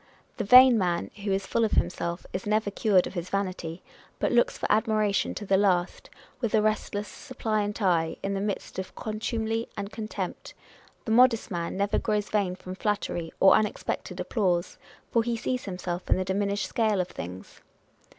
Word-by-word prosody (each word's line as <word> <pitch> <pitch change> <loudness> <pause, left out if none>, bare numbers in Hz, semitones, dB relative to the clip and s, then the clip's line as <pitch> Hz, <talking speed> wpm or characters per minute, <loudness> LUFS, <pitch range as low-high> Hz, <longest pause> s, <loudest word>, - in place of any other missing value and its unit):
The 230 - -1
vain 250 +2 +8
man, 175 -2 -1
who 200 - -1
is 195 0 0
full 230 +4 0
of 220 - 0
himself, 170 +1 -1
is 185 +2 -4
never 215 -1 +1
cured 200 -3 +3
of - - -7
his 175 -1 -4
vanity, 185 -4 -3 0.3
but - - 0
looks - - +3
for - - -4
admiration 215 -2 +1
to 210 - -5
the 195 0 +3
last, 185 -3 +1 0.3
with 235 -3 0
a 215 - +4
restless, 210 -1 -1
suppliant 215 -6 -3
eye, 165 -3 +2
in 200 - -1
the 195 - -2
midst 205 -2 -4
of 190 - -6
contumely 225 +1 -2
and 200 0 -4
contempt; 220 -1 -6 0.5
the 220 - -2
modest 235 -1 +4
man 170 0 -3
never 200 +1 +1
grows 210 -2 -1
vain 200 -4 +1
from 185 0 -8
flattery, 190 -4 -2
or 190 - +7
unexpected 215 -1 -1
applause, 180 -6 -1 0.3
for 230 - +3
he 235 0 -1
sees 255 +2 -2
himself 180 -2 -5
in - - +5
the 185 - -1
diminished 200 +1 -1
scale 215 -4 +1
of - - +4
other 180 - -6
things. 90 +2 -8
205 Hz, 180 wpm, -27 LUFS, 185-220 Hz, 0.5 s, vain